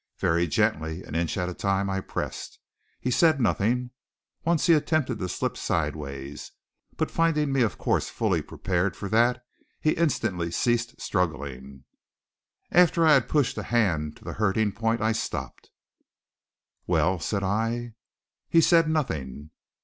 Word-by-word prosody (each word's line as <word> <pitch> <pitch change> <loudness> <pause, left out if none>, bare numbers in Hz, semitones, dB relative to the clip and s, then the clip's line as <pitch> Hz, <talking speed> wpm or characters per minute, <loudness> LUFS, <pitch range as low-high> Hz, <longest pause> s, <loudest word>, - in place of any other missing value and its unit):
Very 85 +1 +1
gently, 80 +3 0
an - - -10
inch 85 +2 -1
at 90 -1 -1
a 90 - -4
time, 100 +1 0
I 95 0 -1
pressed. - - -5 0.4
He 125 - -2
said 155 +2 +4
nothing. 125 +2 +1 0.5
Once 165 -2 +1
he 170 - +6
attempted 155 -5 +1
to 90 - -3
slip - - -2
sidewise; 75 -3 -3 0.5
but - - -1
finding 155 -3 +1
me 135 -1 +2
of 115 - +1
course - - 0
fully - - 0
prepared 90 +1 -2
for 100 - -5
that, 120 +3 +2 0.3
he 155 - +2
instantly 110 - 0
ceased 120 +6 0
struggling. 70 -7 -3 0.9
After 170 -1 +5
I 155 - +7
had 135 -4 +3
pushed 145 -5 +1
the - - -3
hand 85 -11 0
to - - -19
the - - -5
hurting 105 0 +1
point, 115 +3 -1
I 110 +1 +2
stopped. 110 - -4 1.2
"Well?" 95 -1 +2
said 100 +5 -2
I. 115 +4 -1 0.6
He 165 - +5
said 165 0 +5
nothing. 75 - -3
110 Hz, 150 wpm, -26 LUFS, 85-130 Hz, 1.2 s, I